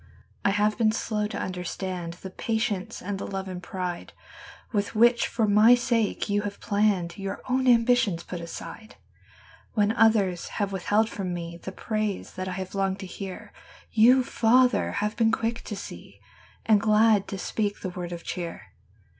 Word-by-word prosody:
I - - +3
have 210 +2 +1
been 220 -2 +4
slow 215 -1 -1
to - - -6
understand 180 -1 -4
The 185 +2 -9
patience 220 -3 -2
and 195 +1 -3
the - - -5
love 195 -1 -4
and 180 -1 -6
pride 180 -1 -5 0.6
"With 205 -1 -1
which 235 +2 +4
for 225 - 0
my 210 +4 +7
sake 235 -3 0
you 205 0 +1
have 205 -1 -5
hour 195 -2 0
own 260 0 +1
ambitions 230 -7 +3
put 175 -2 -6
aside. 215 +6 -9 0.8
from 205 -2 +1
me 170 0 -6
The 190 - -6
praise 215 0 -3
that 185 0 -5
I 185 - -3
have 185 0 -5
longed 195 -1 0
to - - -5
hear, 190 0 -8 0.4
Y>u, 250 +4 +6
Father, 245 -1 +3
have 210 +1 -1
been 225 -1 +3
quick 230 +1 -1
to 210 - -5
see 100 - -10 0.5
Ar^d 215 -2 +6
glad 215 -1 +4
to 195 - -5
speak 205 +1 -2
the 185 - -3
word 180 -1 -6
of 170 -1 -6
cheer. 170 -2 -6
205 Hz, 155 wpm, -26 LUFS, 185-220 Hz, 0.8 s, my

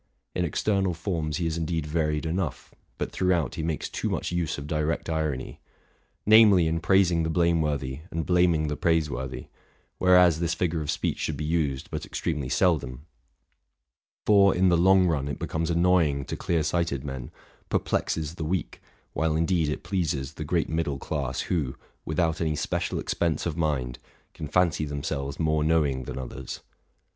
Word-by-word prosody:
In 90 - 0
external 95 +2 0
forms 80 -4 -2
he 85 - -2
is 80 0 -1
indeed 80 -1 -2
varied 75 0 -1
enough, 85 -1 -3 0.2
but - - -3
throughout 90 -7 +1
he - - -4
makes 80 -1 -2
too - - -3
much - - -2
use 85 -3 -1
of 70 - -6
direct 75 +2 -1
irony; 75 -5 -2 0.7
namely, 105 -5 +7
in 80 +1 0
praising 90 -1 +3
the 80 - -1
blameworthy 75 -5 0
and 80 -1 -3
blam 90 -1 +4
ing 75 0 0
the 75 - -2
praiseworthy, 75 -6 -1 0.5
whereas 90 -3 +5
this 85 0 0
figure 85 -2 -1
of 75 - -5
speech - - -1
should 75 - -2
be 75 - -3
used 75 -5 -1
but - - -4
extremely 75 -6 -3
seldom; 70 -5 +1 1.2
for, 100 -2 +5
in 95 +1 +4
the 85 - +4
long 95 +2 +5
run, 75 -5 0
it 70 - -4
becomes 80 +1 -2
annoying 85 -5 +2
to - - -4
clear 85 -2 0
sighted 80 -4 -1
men, 65 -4 -6 0.4
perplexes 80 -1 -1
the 85 - -5
weak, 85 +2 -3 0.3
while 80 -1 0
indeed 80 -1 +1
it 75 - -4
pleases 80 -6 -2
the 80 - -6
great 80 +2 0
middle 80 -3 -1
class, 70 -2 -3
who, 75 -7 -1 0.3
without 80 +1 0
any 80 -2 0
special - - -2
expense 85 -4 -1
of 85 -3 -2
mind, 70 -7 -1 0.3
can 75 - -6
fancy 80 0 +2
themselves 70 -1 -4
more 80 -1 +1
know 80 0 +3
ing 65 -3 -2
than - - -6
others. 65 0 -6
80 Hz, 170 wpm, -26 LUFS, 75-85 Hz, 1.2 s, namely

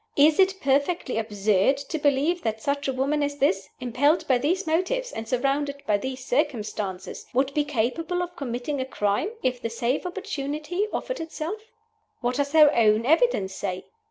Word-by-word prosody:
Is 300 +3 +5
it 385 0 +4
perfectly 280 -2 +1
absurd 210 +2 +2
to 285 +3 -4
believe 295 +4 +2
that 220 -3 -2
such 280 +4 -1
a - - +1
woman 280 +3 0
as 285 0 -1
this, 195 -9 +1
impelled 265 +6 +1
by 255 -2 +3
these 355 +9 0
motives, 370 +11 0
and 225 0 -6
surrounded 280 +2 0
by 205 -1 +2
these 260 +2 -5
circumstances, 215 - -2
would 270 +2 +2
be 295 - +2
capable 295 +7 -1
of 355 0 -7
committing 265 -1 -3
a - - -2
crime 210 - 0
if 255 -1 0
the 230 - -2
safe 235 +4 -1
opportunity 350 0 -3
offered - - -3
itself? 325 +5 -5 0.6
What 245 0 -1
does 285 +1 -1
her 305 -2 +7
own 220 0 +4
evidence 295 - +3
say? 185 -2 -4
280 Hz, 170 wpm, -25 LUFS, 240-315 Hz, 0.6 s, her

